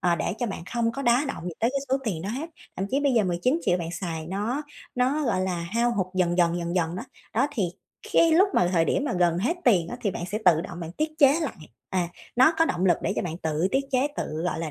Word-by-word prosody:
ờ, 175 -1 +3
để 175 +3 -2
cho 245 - -1
bạn 195 -5 -5
không 230 -1 +1
có 275 - -5
đá 245 +3 +3
động 220 - -5
gì 175 - -4
tới 230 - +3
cái 275 +1 -1
số 265 - +3
tiền 175 -8 -2
đó 195 - -4
hết. 275 +10 -4 0.3
Thậm 195 - -2
chí 275 - +1
bây 280 -2 +2
giờ 225 -4 +3
19.000.000 185 - +1
bạn 165 -1 -4
xài 165 -3 -4
nó 210 - -2 0.3
nó, 265 +4 +1
gọi 230 -6 +1
là, 185 -2 -1
hao 235 +1 +2
hụt 190 -3 +1
dần 180 -1 +1
dần, 170 0 +3
dần 170 +1 -3
dần 170 0 0
đó, 220 - -4 0.3
đó 255 +5 +3
thì 225 -8 -1 0.5
cái 330 -1 +5
lúc 375 +5 +5
mà 175 - +3
thời 165 -2 +3
điểm 275 - 0
mà 270 - -1
gần 175 -2 +2
hết 250 - 0
tiền 180 -9 +4
á, 245 - -5
thì 200 - 0
bạn 175 - -5
sẽ 205 +3 -3
tự 170 -3 +5
động 175 +1 -7
bạn 165 -1 -6
tiết 310 - -1
chế 285 +3 +5
lại, 310 - -2 0.4
à, 180 -2 0 0.3
nó 260 +6 +6
có 325 - +6
động 185 - 0
lực 175 - +5
để - - 0
cho - - 0
bạn 170 -2 -4
tự 160 +1 0
tiết 275 +1 +2
chế 260 +1 +2
tự, - - -2 0.2
gọi 180 - -1
là, 165 -2 -3
195 Hz, 280 wpm, -26 LUFS, 175-260 Hz, 0.5 s, nó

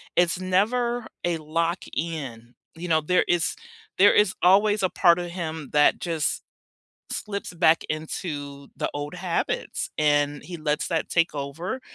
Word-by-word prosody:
It's 175 0 +2
never 225 +6 +1 0.2
a 175 -1 0
lock 165 +3 -1
in, 130 -8 -5 0.2
you 175 +2 -6
know, 160 -1 +4
there 180 +4 +2
is 175 -2 +1 0.4
there 200 +2 +7
is 205 -2 +4
always 205 +3 +4
a 185 - +3
part 175 -1 +4
of 175 - -3
him 160 -4 -5
that 150 0 +4
just 165 -4 -1 0.7
slips 200 -3 -4
back 165 -1 +4
into 145 -3 -5
the - - -1
old 145 +3 -4
habits 180 -1 -2
and 145 -1 +2
he 175 -1 -7
lets 150 -1 -1
that 165 -2 -1
take 165 -2 +2
over. 160 - -4
170 Hz, 150 wpm, -25 LUFS, 150-185 Hz, 0.7 s, there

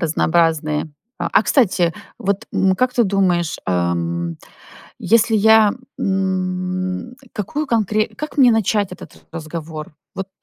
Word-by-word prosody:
разнообразные 160 -2 +1 0.3
а - - -2
а - - +5
кстати, 180 - +2 0.3
вот, 200 +3 -2
м, 190 -1 +2
как 250 +5 +1
ты 240 -2 +3
думаешь, 185 -4 +1
эм, 85 -2 -1 0.6
если 225 0 +3
я, 220 0 +6 0.3
м, 185 +2 -2 0.2
какую 285 +9 -3
конкре 215 -1 +1
как 300 0 -6
мне 255 -3 +7
начать 210 -3 +1
этот 180 - -12
разговор? 155 -1 -7 0.2
Вот 195 0 -4
185 Hz, 120 wpm, -19 LUFS, 165-215 Hz, 0.6 s, мне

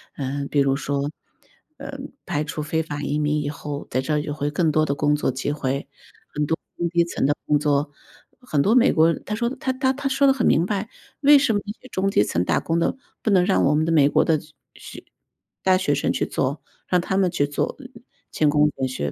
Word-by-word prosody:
嗯， 140 0 -3
比 145 - 0
如 135 -1 +3
说， 140 +1 -2 0.7
呃， - - -7 0.3
排 150 - -1
除 150 0 -5
非 160 +2 -1
法 145 -2 -5
移 145 +1 -1
民 150 0 0
以 145 - -3
后， 145 -1 -6
在 130 - +1
这 150 +2 0
就 150 0 -4
会 145 0 -2
更 155 +1 +1
多 155 +1 +2
的 140 - -1
工 145 +1 +2
作 150 - -1
机 130 +3 -3
会， 140 -2 -2 0.5
很 150 0 0
多 160 +2 -1 0.2
中 175 - 0
低 170 0 +3
层 170 - -2
的 145 - +3
工 150 -1 +2
作。 145 0 0 0.5
很 155 - 0
多 210 - +3
美 250 +1 +5
国 165 +1 +4
他 210 - -3
说 235 +2 0
他 260 0 -2
他 260 0 +1
他 275 +1 -3
说 275 +1 +2
得 275 - +6
很 265 -3 +1
明 165 - +3
白， 205 +2 -2 0.3
为 290 0 +7
什 270 -4 +2
么 205 - +1
那 205 - -5
些 255 - -13
中 195 -2 0
低 150 - +3
层 90 -3 -1
打 - - +1
工 165 +1 0
的， 170 - 0 0.3
不 - - -1
能 185 -3 +4
让 190 - +2
我 150 - +3
们 155 - +2
的 165 - 0
美 150 -4 +5
国 - - +3
的 160 -1 +2
去 155 +1 -14 0.2
去 - - -12 0.6
大 185 -1 +4
学 185 -6 0
生 140 - 0
去 - - 0
做， 135 +3 -2 0.3
让 180 -1 +2
他 190 +2 -2
们 190 -2 +3
去 170 -5 0
做， 145 0 -2 0.6
勤 150 - +2
工 150 0 +4
俭 130 - 0
学， 75 - -3
150 Hz, 255 characters per minute, -23 LUFS, 145-185 Hz, 0.7 s, 为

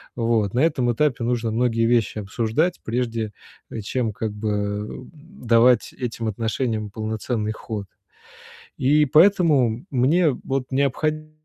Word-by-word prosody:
Вот 115 -4 0
на 125 - 0
этом 135 -5 +2
этапе 130 -1 0
нужно 115 -1 -1
многие 115 0 +1
вещи 115 -3 +1
обсуждать, 115 - -1
прежде, 115 -2 -2 0.4
э, - - -5
чем, 115 +2 -2
как 110 +1 -3
бы, 105 +1 -3
эм, 105 +3 -3
давать 125 -6 +2
этим 115 -2 -4
отношениям 110 0 -2
полноценный 110 0 -3
ход. 105 -3 -6 0.9
И 150 +3 +3
поэтому, 150 - +4
мне 150 +6 +3
вот 135 0 -3
необходимо 155 +3 -1
120 Hz, 125 wpm, -23 LUFS, 110-135 Hz, 0.9 s, поэтому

